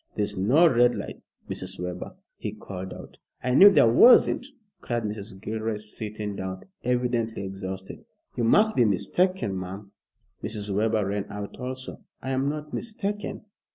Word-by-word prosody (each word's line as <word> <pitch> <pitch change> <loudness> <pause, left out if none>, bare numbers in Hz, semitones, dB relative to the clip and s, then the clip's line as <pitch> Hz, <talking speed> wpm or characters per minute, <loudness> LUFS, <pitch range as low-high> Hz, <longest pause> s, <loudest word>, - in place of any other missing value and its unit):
"There's 105 -1 -1
no 130 - +5
red 120 -4 +4
light, 105 - -6 0.3
Mrs. 95 0 -5
Webber," 90 0 -5 0.2
he - - -4
called 95 -1 -7
out. - - -11 0.2
"I 125 - 0
knew 195 +10 +10
there 195 - +5
wasn't," 245 - +6 0.3
cried 120 -1 -2
Mrs. 105 -2 -5
Gilroy, 110 +1 -3
sitting 105 -1 -5
down, 95 -1 -5 0.2
evidently 120 -3 0
exhausted. 95 0 -6 0.3
"You 120 - -1
must 215 - +4
be 125 - +5
mistaken, 115 - +1
ma'am." 95 +2 -8 0.5
Mrs. 105 -2 -4
Webber 110 0 +1
ran 100 +1 -2
out 100 0 -7
also. 130 0 -5 0.2
"I 130 - -4
am 135 +1 +1
not 150 0 -5
mistaken. 210 -2 -4
110 Hz, 150 wpm, -26 LUFS, 100-130 Hz, 0.5 s, knew